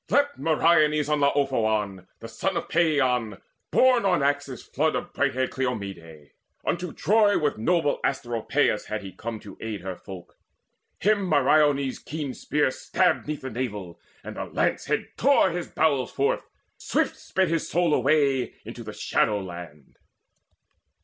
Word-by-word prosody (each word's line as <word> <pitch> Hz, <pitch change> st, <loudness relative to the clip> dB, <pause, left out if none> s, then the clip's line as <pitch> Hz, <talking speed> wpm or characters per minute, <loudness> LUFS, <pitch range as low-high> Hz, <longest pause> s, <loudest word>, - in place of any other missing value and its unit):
Leapt 285 Hz, +1 st, +2 dB
Meriones 155 Hz, -2 st, +3 dB
upon 150 Hz, -1 st, +2 dB
Laophoon 110 Hz, -9 st, 0 dB
The 115 Hz, -, -7 dB
son 170 Hz, +12 st, -2 dB
of -, -, -3 dB
Paeon, 130 Hz, -, +1 dB, 0.3 s
born 255 Hz, -2 st, +4 dB
by 190 Hz, -4 st, +2 dB
Axius' 140 Hz, -2 st, -1 dB
flood -, -, 0 dB
Of -, -, -4 dB
bright -, -, 0 dB
haired 130 Hz, 0 st, 0 dB
Cleomede. 95 Hz, -, -5 dB, 0.3 s
Unto 175 Hz, -1 st, -2 dB
Troy 210 Hz, 0 st, +3 dB
With 145 Hz, -7 st, -1 dB
noble 165 Hz, +4 st, +1 dB
Asteropaeus 120 Hz, -2 st, 0 dB
had 110 Hz, -1 st, -4 dB
he 95 Hz, -, -7 dB
come 110 Hz, +4 st, -6 dB
To 100 Hz, -3 st, -12 dB
aid 110 Hz, -2 st, -4 dB
her 95 Hz, -1 st, -5 dB
folk: 90 Hz, -2 st, -12 dB, 0.6 s
him 205 Hz, -2 st, +2 dB
Meriones' 145 Hz, -2 st, +3 dB
keen 150 Hz, -4 st, -5 dB
spear 150 Hz, 0 st, 0 dB
Stabbed 180 Hz, +5 st, 0 dB
'neath 150 Hz, -1 st, -4 dB
the 130 Hz, -, -6 dB
navel, 105 Hz, -8 st, -5 dB, 0.2 s
and -, -, -8 dB
the -, -, -3 dB
lance -, -, -1 dB
head -, -, -1 dB
tore 270 Hz, -8 st, +4 dB
His 175 Hz, 0 st, -4 dB
bowels 140 Hz, -6 st, +1 dB
forth; 140 Hz, 0 st, -1 dB, 0.3 s
swift -, -, 0 dB
sped 190 Hz, -2 st, -1 dB
his 165 Hz, -1 st, -1 dB
soul 175 Hz, -2 st, +2 dB
away 140 Hz, -5 st, +2 dB
Into -, -, -8 dB
the -, -, -7 dB
Shadow 105 Hz, -1 st, +1 dB
land. 85 Hz, -6 st, -10 dB
140 Hz, 150 wpm, -25 LUFS, 110-160 Hz, 0.6 s, born